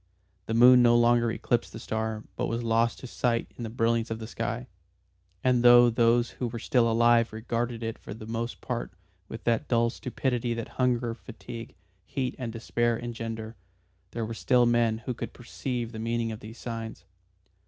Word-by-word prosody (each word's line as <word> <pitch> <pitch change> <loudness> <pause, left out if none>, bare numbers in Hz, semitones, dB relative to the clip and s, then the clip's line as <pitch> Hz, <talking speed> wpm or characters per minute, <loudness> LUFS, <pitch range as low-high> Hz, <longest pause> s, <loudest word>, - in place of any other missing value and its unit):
The 115 - -1
moon 125 +2 +8
no 120 -1 +6
longer 120 0 +4
eclipsed 120 +1 -1
the 110 - -7
star 110 -1 -3
but - - -1
was 115 +1 -2
lost 115 0 +2
to - - -7
sight 120 -1 -1
in 120 - -7
the 115 - -4
brilliance 115 0 +1
of 110 - -3
the 110 - -7
sky. 115 - -3 0.8
And 125 -1 +3
though 120 0 +8
those 115 +1 +3
who 125 - -3
were 115 0 -5
still 115 0 +2
alive 115 0 +4
regarded 115 +1 -3
it 115 0 -4
for - - -10
the 110 - -9
most 115 +2 -4
part 120 -6 -4 0.3
with 115 - -8
that 115 -2 +1
dull 115 -1 +2
stupidity 125 -2 -2
that 115 -1 -5
hunger, 120 -2 0
fatigue, 115 -1 -9 0.3
heat 130 -2 -3
and 120 -3 -3
despair 120 0 0
engender, 115 -1 -5 0.5
there 115 -1 -3
were 115 - -5
still 125 +2 +3
men 120 -2 +2
who 125 - -1
could - - -6
perceive 120 -1 -4
the 110 - -7
meaning 115 0 -1
of 110 - -6
these 110 +3 -10
signs. 115 -2 -6
115 Hz, 185 wpm, -28 LUFS, 115-120 Hz, 0.8 s, moon